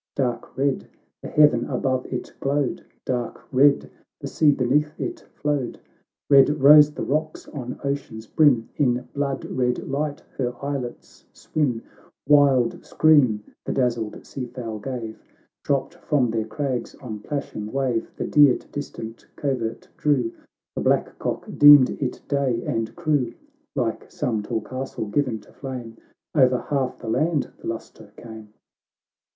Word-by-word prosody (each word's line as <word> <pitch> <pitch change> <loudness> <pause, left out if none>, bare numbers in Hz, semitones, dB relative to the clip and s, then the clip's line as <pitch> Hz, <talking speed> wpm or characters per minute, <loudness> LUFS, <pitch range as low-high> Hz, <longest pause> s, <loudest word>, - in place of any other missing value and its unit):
Dark 120 -4 -2
red 140 0 0 0.3
the - - -7
heaven 150 0 +4
above 130 -1 -1
it - - -5
glowed, 140 -1 -1 0.2
Dark 125 -2 -2
red 140 +2 +4 0.3
the - - -7
sea 150 -2 +3
beneath 145 +4 +1
it 350 -1 -3 0.2
flowed, 145 -4 -2 0.5
lied 140 -1 +7
rose 150 +1 +7
the - - -5
rocks 155 +2 -2
on 125 -4 -6
ocean's 140 -6 -4
brim, 125 -3 +3
In 125 -3 +1
blood 140 -1 -2
red 125 -1 -1
light 145 +1 -2 0.2
her 125 -2 -1
islets 140 -4 -5
swim; 130 -7 -1 0.4
"Wild 140 -5 +4
scream 135 -10 +4 0.2
the - - -3
dazzled 120 -4 -1
sea 130 -3 -6
fowl 120 -3 -6
gave, 115 -2 -6 0.4
Dropped 140 +2 0
from 145 -8 0
their 110 -1 -1
crags 125 +1 -3
on 110 -6 -7
plashing 110 -4 -5
wave; 130 -4 -1
The - - -3
deer 145 -4 +5
to - - -18
distant 115 -5 -7
covert 120 -5 -3
drew, 130 -6 +1 0.4
The - - -2
black - - +1
cock - - -3
deemed 145 -3 +9
it 130 - -2
day, 135 -5 0
and 115 -1 -2
crew. 150 -8 0 0.4
Like 120 -5 -2
some 110 -4 -1
tall 110 +2 -2
castle 130 +1 -5
given 125 -1 0
to - - -20
flame, 125 -4 -7 0.4
O'er 130 -3 +5
half 135 -3 0
the 115 - -10
land 155 +5 0
the - - -8
lustre 110 -2 -7
came. 110 -2 -11
130 Hz, 145 wpm, -24 LUFS, 115-145 Hz, 0.5 s, deemed